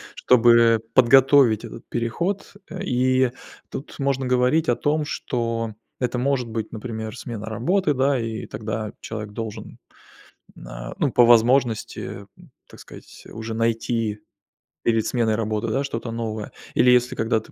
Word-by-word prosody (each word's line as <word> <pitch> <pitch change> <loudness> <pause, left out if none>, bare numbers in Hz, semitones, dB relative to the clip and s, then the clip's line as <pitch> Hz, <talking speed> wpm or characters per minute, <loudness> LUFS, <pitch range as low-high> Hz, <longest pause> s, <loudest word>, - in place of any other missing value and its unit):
чтобы 115 -2 +5
подготовить 130 -2 +5
этот - - -11
переход. 170 - -2 0.2
Э, 190 0 -6
и 130 -4 +2 0.4
тут 140 - -7
можно 135 -2 -1
говорить 125 +6 +2
о 120 - +3
том, 150 +4 0
что 115 -5 -3 0.3
это 125 -1 -1
может 130 -1 0
быть, 110 -1 -4
например, 110 0 -6
смена 110 -4 -7
работы, 150 - 0
да, 135 0 +2
и 115 -1 -4
тогда 110 0 -5
человек 105 -2 -6
должен 110 -1 -7 0.8
н - - -12
на- - - -8
ну, - - +1
по 120 - +6
возможности- 120 0 +3 0.4
м, - - -18 0.2
так - - -14
сказать, - - -14
уже 110 +1 -6
найти 115 -1 -1 0.6
перед 115 -2 +2
сменой 115 -3 +1
работы, 110 0 -2
да, 135 +5 0
что-то 115 -4 -4
новое. 110 -2 -4 0.2
Или 125 - +4
если, 125 +1 +3
когда 110 -1 0
ты - - -18
115 Hz, 145 wpm, -23 LUFS, 110-130 Hz, 0.8 s, по